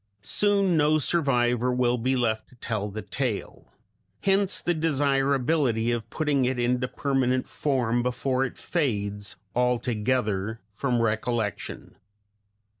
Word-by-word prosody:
Soon 200 -3 +2
no 155 0 +4
survivor 125 -6 +1
will 125 -1 +1
be 130 +3 +1
left 110 -3 0
to - - -19
tell 110 -3 -3
the 110 +2 -6
tale; 125 -7 -4 0.5
hence 195 0 +2
the 175 - 0
desirability 140 -5 +1
of 115 -1 -3
putting 145 -2 +1
it 125 0 0
into 125 +1 +1
permanent 130 -2 0
form 120 -5 0
before 125 +1 0
it 135 - -4
fades 105 - -2 0.2
altogether 115 -3 0
from 120 +1 0
recollection. 110 -1 -2
125 Hz, 115 wpm, -26 LUFS, 115-140 Hz, 0.5 s, no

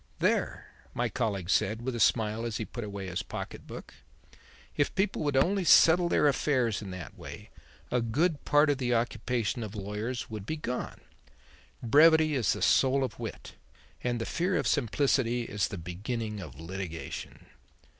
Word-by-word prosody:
"There," - - 0 0.3
my 120 -1 0
colleague 100 -8 -2
said 110 +3 +1
with 130 +1 -2
a 120 - -4
smile 110 0 +2
as 115 -2 -2
he 110 - -3
put 120 +2 -6
away 100 -2 -6
his 90 -1 -3
pocket - - -7
book, - - -9 0.8
"if 145 - 0
people 195 +2 0
would 145 -2 +1
only 190 +7 +2
settle 175 +1 +6
their 150 - +3
affairs 130 -6 +1
in 100 - -7
that 90 -2 -8
way, - - -10 0.4
a 125 - +2
good 145 +8 0
part 145 0 +4
of 140 - -2
the 125 -2 +1
occupation 115 0 -1
of 110 -1 -6
lawyers 105 +5 -4
would 105 -2 -7
be 155 - -2
gone. 125 -4 -4 0.8
Brevity 155 +5 +6
is 125 -7 +2
the - - -4
soul 135 0 +4
of 125 -5 -4
wit; - - -7 0.5
and 120 -1 -1
the 115 - -2
fear 180 +2 0
of - - 0
simplicity 120 0 +1
is 105 -3 -1
the 100 - -6
beginning 105 +6 -4
of 80 -8 -9
litigation." 85 -1 -6
120 Hz, 170 wpm, -29 LUFS, 105-140 Hz, 0.8 s, settle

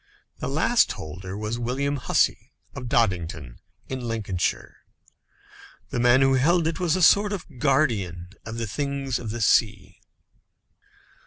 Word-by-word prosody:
The - - -3
last - - +2
holder 90 +5 -8
was 110 +3 -3
William 135 +4 -1
Hussey, 125 - 0 0.2
of 125 - -7
Doddington, 85 - -1 0.3
in 130 - -4
Lincolnshire. 105 -6 -2 1.1
The - - -2
man 120 +2 +5
who 135 0 +4
held 160 +6 +3
it 165 +3 -2
was 175 -2 +1
a 185 - +1
sort 205 +4 +5
of 160 -9 -7
guardian 110 - 0
of 110 +1 -7
the 115 - -2
things 140 +2 -3
of 115 - -6
the 115 +2 -4
sea. 105 -1 +1
120 Hz, 140 wpm, -24 LUFS, 100-140 Hz, 1.1 s, man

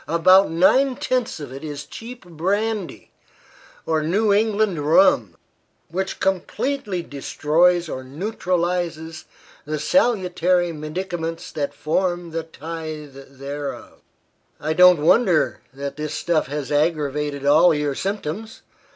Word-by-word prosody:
About 185 +4 +5
nine 250 +11 +3
tenths 250 -7 -1
of 140 -4 -8
it 135 +3 -9
is 145 -2 -6
cheap 235 -2 -10
brandy, 195 +4 -2 0.7
or 160 -1 +1
New 200 +7 +2
England 210 -4 +1
rum, 280 - +3 0.5
which 190 +2 -3
completely 195 +1 -1
destroys 170 +4 +1
or 130 -4 -5
neutralizes 170 0 -2 0.4
the 155 +1 -3
salutary 180 - +2
medicaments 165 +2 -5
that 145 -2 -2
form 175 +1 -1
the 165 +1 -2
tithe 155 -2 -7 0.2
thereof. 140 +1 -6 0.6
I 155 +1 -1
don't 180 -2 +6
wonder 180 -4 +3
that 140 +1 -6
this 155 0 -4
stuff 165 -5 0
has 145 0 -5
aggravated 145 -2 0
all 155 +5 +6
your 150 -2 0
symptoms. 200 +5 -5
165 Hz, 115 wpm, -22 LUFS, 150-190 Hz, 0.7 s, don't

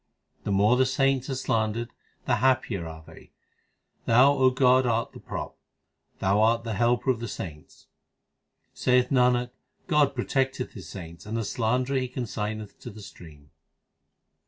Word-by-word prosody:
The - - -1
more 105 +5 +4
the 130 0 +3
saints 135 0 +1
are 135 - -1
slandered, 115 -2 -1 0.3
the - - +2
happier 120 -9 +1
are 80 -1 -10
they, - - -16 0.7
Thou, 125 +5 +6
O 130 -2 +4
God, 130 0 +3
art 115 0 0
the - - -12
prop, - - -6 0.6
Thou 100 +2 +2
art 115 +1 +3
the 115 -1 -3
helper 120 +5 +2
of 120 - -3
the 115 - -4
saints. 80 -7 -9 0.9
Saith 125 0 +2
Nanak, 125 -1 +3 0.3
God 150 -4 +2
protecteth 130 +1 -1
His 90 -7 -10
saints, 85 +1 -10
and 110 +2 -3
the 115 - -2
slanderer 125 +5 0
He 130 - -2
consigneth 110 -4 -5
to - - -8
the 105 0 -11
stream. 75 -7 -14
120 Hz, 155 wpm, -26 LUFS, 105-130 Hz, 0.9 s, Thou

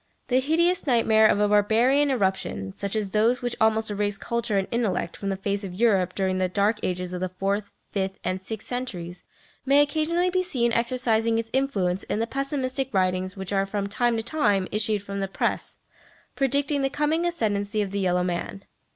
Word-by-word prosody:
The 255 0 +4
hideous 335 +5 +1
nightmare 220 -3 +5
of 205 - +2
a 210 - +3
barbarian 230 +8 +3
irruption, 190 - -1
such 200 +1 -3
as 210 -3 -2
those 230 +4 +2
which 245 -1 -1
almost 220 0 +2
erased 205 0 -1
culture 235 -3 -1
and 195 - 0
intellect 215 -7 -1
from 200 - -4
the 195 - -1
face 200 +1 -2
of 185 -2 -6
Europe 195 -4 +2
during 190 -1 0
the 185 -1 +1
dark 205 +3 +1
ages 180 0 -3
of 180 - -4
the 185 - -1
fourth, 195 +3 -2 0.2
fifth 190 -1 -2
and 185 +1 -2
sixth 215 +2 -6
centuries, 180 -9 -5 0.4
may 275 +2 +4
occasionally 320 +5 +1
be 370 0 +2
seen 250 -10 0
exercising 230 -2 +1
its 225 0 -3
influence 195 -9 0
in - - -3
the 225 - 0
pessimistic 270 0 -2
writings 185 0 0
which 190 +1 -4
are 195 0 +1
from 200 0 -2
time 235 +3 0
to 225 - -2
time 205 -9 +1
issued 210 -1 +1
from 200 0 -5
the 195 - -1
Press 190 - -2 0.6
predicting 280 +1 +1
the 270 - +1
coming 300 +4 0
ascendency 215 -11 -1
of 195 - -6
the 200 - -2
yellow 180 -2 +1
man. 180 +2 -3
215 Hz, 195 wpm, -25 LUFS, 195-255 Hz, 0.6 s, nightmare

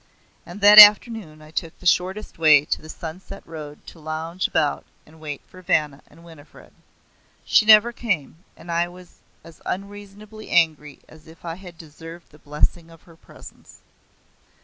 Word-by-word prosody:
And 180 +4 -11
that 205 +1 +8
afternoon 210 -6 +5
I 155 - -16
took 165 +1 -6
the - - -18
shortest 185 +2 -1
way 150 -3 +5
to - - -3
the 155 - -14
sun 160 +2 -9
set 195 +1 -13
road 150 -2 -11
to 165 - -14
lounge 160 +3 -5
about 150 -2 -2 0.2
and 160 +1 -20
wait 150 -3 -8
for 185 - -16
Vanna 150 -5 -1
and 165 - -20
Winifred. 160 -3 -17 0.7
She 215 - +2
never 220 +2 +6
came, 180 - -5
and 170 - -10
I 170 +1 -1
was 180 0 -17 0.2
as 165 0 -17
unreasonably 205 +2 -9
angry 155 -4 0
as 155 0 -19
if 165 +2 -17
I 165 - -5
had 175 -1 -13
deserved 165 +1 -14
the 150 - -20
blessing 150 +3 -3
of 165 -1 -19
her 170 - -19
presence. - - -17
165 Hz, 170 wpm, -21 LUFS, 155-190 Hz, 0.7 s, that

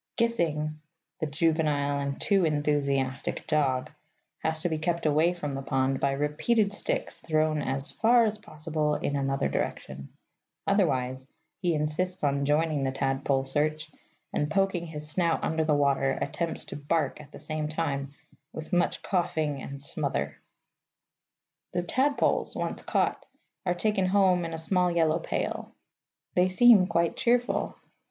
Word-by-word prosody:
Gissing 155 -10 0 0.4
(the 155 - -1
juvenile 145 -2 +1
and 140 0 -3
too 195 -2 +3
enthusiastic 145 -4 0
dog) 135 -4 +1 0.5
has 160 0 0
to 175 - +1
be 160 -1 -2
kept 170 +1 -1
away 155 +3 +4
from 150 -5 -4
the 135 - -3
pond 135 0 0
by 140 0 +1
repeated 200 +10 +1
sticks - - -3
thrown 155 -1 +1
as 135 0 -2
far 235 +1 +4
as 215 -1 -2
possible 155 -4 -2
in 145 - -2
another 135 - 0
direction; 70 0 -4 0.6
otherwise 130 -10 +1 0.3
he 175 -3 +1
insists 155 +5 -1
on 140 -1 +1
joining 150 0 +1
the 135 - +1
tadpole 135 0 0
search, 155 +3 -1 0.4
and, 150 - 0
poking 190 -1 0
his 150 -1 -5
snout 165 +1 +1
under 160 0 0
water, 140 -3 +2
attempts 165 +4 -3
to - - -7
bark 150 0 -1
at 145 - -15
the - - -10
same 155 +1 -3
time, 145 -3 -2 0.4
with 160 +4 -7
much 175 0 +1
coughing 160 -6 -1
and 140 +1 -7
smother. 140 - -2 1.4
The 175 0 0
tadpoles, 270 +10 +1
once - - -3
caught, - - 0 0.4
are 180 - +2
taken 195 0 +1
home 185 -2 +3
in 165 - -5
a - - -5
small 180 +2 +2
yellow 165 -1 +2
pail. - - -3 0.6
They 180 +1 +3
seem 205 -1 +6
quite 170 -1 +1
cheerful. 245 +1 +1
155 Hz, 145 wpm, -28 LUFS, 140-175 Hz, 1.4 s, seem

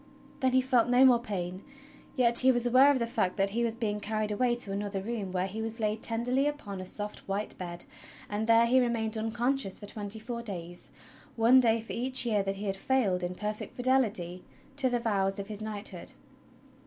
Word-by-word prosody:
Then 260 -1 +1
he 260 - +5
felt 250 -2 +2
no 250 +2 +6
more 245 -2 +6
pain, 185 -5 -5 0.5
yet 235 -2 +6
he 260 0 +6
was 240 -1 0
aware 255 +3 +6
of 285 - +3
the 235 - 0
fact 230 -6 -1
that 195 0 +1
he 235 +3 0
was 230 -1 -1
being 210 -3 -2
carried 215 0 -2
away 240 +3 +1
to 240 -5 -4
another 200 0 -3
room 205 -2 -4
where 185 0 -1
he 205 +3 -5
was 225 +1 -4
laid 215 0 -1
tenderly 245 +5 0
upon 205 -10 -5
a 185 - -5
soft 210 +2 -6
white 200 +2 -3
bed; 175 -1 -6 0.4
and 210 +2 -3
there 230 0 +6
he 255 +2 +4
remained 230 -3 0
unconscious 230 0 -1
for - - -9
tw^enty 205 +1 -3
four 235 +1 -5
days 175 -5 -6 0.2
— - - -23
one 255 +3 +8
day 230 -2 +3
for 225 - -8
each 255 +1 +3
year 215 -4 +2
that 195 0 -2
he 200 +2 -6
had 195 -1 -2
failed 200 -6 +1
in 180 0 -3
perfect 210 +2 -5
fidelity 220 -9 0 0.3
to 270 -2 +1
the 245 - +1
vows 195 -4 0
of 200 +1 -6
his 210 0 -5
knighthood. 215 -1 -6
220 Hz, 215 wpm, -29 LUFS, 200-245 Hz, 0.5 s, one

